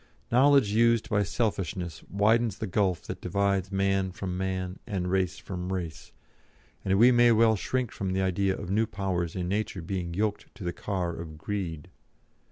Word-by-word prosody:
Knowledge 130 -2 +5
used 115 +1 +3
by 105 -1 +3
selfishness 95 -5 -2
widens 110 +1 +2
the - - -3
gulf 95 -3 0
that - - -7
divides 100 +1 0
man 95 -1 +1
from 95 -1 -4
man 95 0 -3
and 90 -4 -2
race 95 -2 +1
from 90 -1 -5
race, 85 -4 -5 0.7
and 95 0 +2
we 120 +4 +7
may 120 -1 +6
well 110 0 +5
shrink 125 +3 -2
from 95 -2 -3
the 95 - +1
idea 95 +1 +1
of 95 -2 -6
new 110 +2 +2
powers 90 -4 -2
in 90 -2 -2
Nature 100 -2 -2
being 85 -1 -3
yoked 105 +1 -2
to - - -9
the 85 0 -2
car 90 -2 -2
of 80 -2 -8
Greed. 85 -4 -4
95 Hz, 175 wpm, -28 LUFS, 90-105 Hz, 0.7 s, we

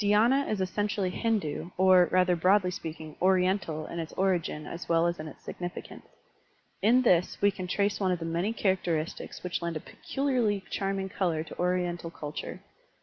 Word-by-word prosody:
Dhydna 230 +7 +4
is 210 -3 -1
essentially 200 0 -1
Hindu 195 -8 -1
or, 185 -1 +6
rather 180 -1 +4
broadly 185 +2 +3
speaking. 160 -3 -7
Oriental 185 -4 +2
in 170 - -6
its 160 -1 -4
origin 180 -5 0
as 170 - -7
well 165 0 +4
as 170 0 0
in 155 - -5
its 150 - -12
significance. 175 0 -7 0.7
In 240 +6 +5
this 180 -6 +3
we 205 - +4
can 185 -1 -6
trace 200 +2 0
one 190 -2 +1
of 180 - +1
the 165 - -5
many 170 +6 0
characteristics 180 -7 -1
which 180 -1 -2
lend 170 -2 -2
a - - -5
peculiarly 245 - -1
charming 195 -1 -1
color 170 -5 0
to 160 - -11
Oriental 175 -1 0
culture. 150 -2 -6
180 Hz, 170 wpm, -29 LUFS, 170-200 Hz, 0.7 s, or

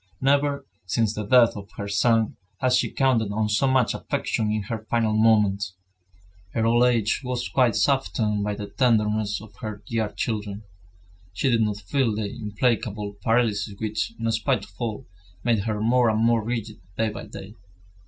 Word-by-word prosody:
Never, 140 +1 +1 0.2
since 110 +3 +1
the 105 - -4
death 120 +2 +5
of 100 -1 -8
her 100 - -4
son, 110 +2 +2 0.2
had 130 0 +2
she 125 - +2
counted 120 -6 +1
on 105 +1 0
so 105 +6 +2
much 130 -3 +3
affection 110 -1 -2
in 105 -1 -1
her 110 0 -5
final 115 -2 +1
moments. 105 -4 +3 0.8
Her 115 -1 +1
old 120 +2 +4
age 115 -2 +2
was 125 -1 -2
quite 125 -4 +2
softened 110 -7 +1
by 105 0 -1
the 105 - -5
tenderness 105 -5 +1
of 110 - -14
her 105 -1 -6
dear 110 0 -1
children. 105 -2 -4 0.7
She 130 +7 +1
did 115 -1 +3
not 105 -2 0
feel 110 +3 0
the 105 +1 -3
implacable 105 -2 -1
paralysis 110 -3 +1
which, 110 +1 -2
in 115 0 0
spite 115 0 0
of - - -20
all, 115 +2 -3 0.4
made 115 -4 +1
her 110 -2 -1
more 120 +2 +3
and 110 +1 +2
more 115 -1 +3
rigid 115 -1 -4 0.2
day 110 -1 +1
by 105 - -7
day. 100 +1 -9
110 Hz, 175 wpm, -24 LUFS, 105-120 Hz, 0.8 s, death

